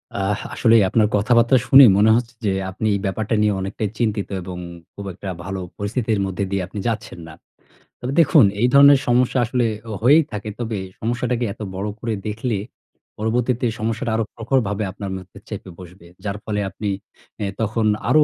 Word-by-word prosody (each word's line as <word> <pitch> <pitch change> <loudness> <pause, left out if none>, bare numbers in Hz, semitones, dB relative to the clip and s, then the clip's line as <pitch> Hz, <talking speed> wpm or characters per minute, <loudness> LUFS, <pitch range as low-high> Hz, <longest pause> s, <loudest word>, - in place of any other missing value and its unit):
অ্যাহ 100 +1 -1
আসলেই 115 -3 +4
আপনার 110 -2 +3
কথাবার্তা 120 +4 +4
শুনে 135 0 +9
মনে 110 +2 +5
হচ্ছে 120 +1 -2
যে, 100 - +2 0.2
আপনি 110 +3 -2
এই - - -1
ব্যাপারটা 110 +3 -1
নিয়ে 105 -1 +3
অনেকটাই 100 +2 -3
চিন্তিত 105 -3 0
এবং 90 0 -7 0.4
খুব 100 - -8
একটা 95 +1 -7 0.2
ভালো 95 -1 -4 0.2
পরিস্থিতির 110 +1 -1
মধ্যে 95 +1 -3
দিয়ে 100 -1 0
আপনি 100 +1 -7
যাচ্ছেন 110 -5 -4
না। 80 - -10 0.7
তবে 130 +2 -4
দেখুন, 145 -6 +6 0.2
এই 120 - +5
ধরনের 140 -1 +8
সমস্যা 125 +1 +2
আসলে 120 +1 0 0.2
অ - - -4
হয়েই 150 +7 +6
থাকে। 105 0 -5
তবে 115 -3 -3 0.2
সমস্যাটাকে 120 +1 -1
এত - - -14
বড় 100 +3 -3
করে 115 -1 -2
দেখলে, 110 +1 -2 0.6
পরবর্তীতে 120 +3 0
সমস্যাটা 115 +1 -2
আরও 115 - +1
প্রখরভাবে 115 -3 0
আপনার 100 -1 -6
মধ্যে 90 -1 -13
চেপে 95 - -7
বসবে। 90 -1 -13 0.2
যার 100 0 -3
ফলে 105 -1 -2
আপনি, 100 +2 -4 0.5
এ্যা 100 -2 -2
তখন 110 +1 0 0.2
আরও 155 0 +6
110 Hz, 175 wpm, -21 LUFS, 100-120 Hz, 0.7 s, শুনে